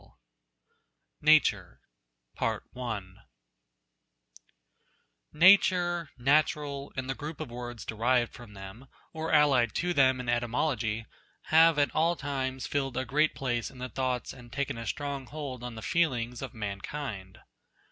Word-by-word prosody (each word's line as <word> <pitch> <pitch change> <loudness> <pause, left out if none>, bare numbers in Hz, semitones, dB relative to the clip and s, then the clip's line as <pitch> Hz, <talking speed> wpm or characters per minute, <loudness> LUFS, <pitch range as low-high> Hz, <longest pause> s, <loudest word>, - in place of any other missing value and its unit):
242 155 -8 +6
NATURE 90 - -22 0.6
NATUEE 105 -7 -4 2.1
"VT 175 +5 +10
ATTIRE, 175 -3 -1
natural, 140 +1 +1
and 130 0 -3
tlie 135 - -2
group 155 +1 -6
of 155 -6 -6
words 120 -1 -7
derived 120 +2 +1
from 120 -4 -12
them, 95 +7 -10 0.3
or 160 0 -3
allied 140 -7 +4
to 175 0 0
them 130 -4 +4
in 125 - -6
etymology, 120 -2 0 0.4
have 160 0 +6
at 145 -1 +2
all 170 +2 +2
times 130 -4 -3
filled 135 -3 -2
a 130 - -1
great 150 +5 +2
place 120 -3 -2
in - - -15
the 125 0 -5
thoughts 130 0 -2
and 120 -2 -14
taken 135 -3 -2
a 115 - -6
strong 140 -2 -4
hold 140 -5 -6
on 125 -1 -6
the 110 - -8
feelings 125 -8 0
of 135 -2 -7
mankind. 100 -1 -5
130 Hz, 135 wpm, -29 LUFS, 120-150 Hz, 2.1 s, VT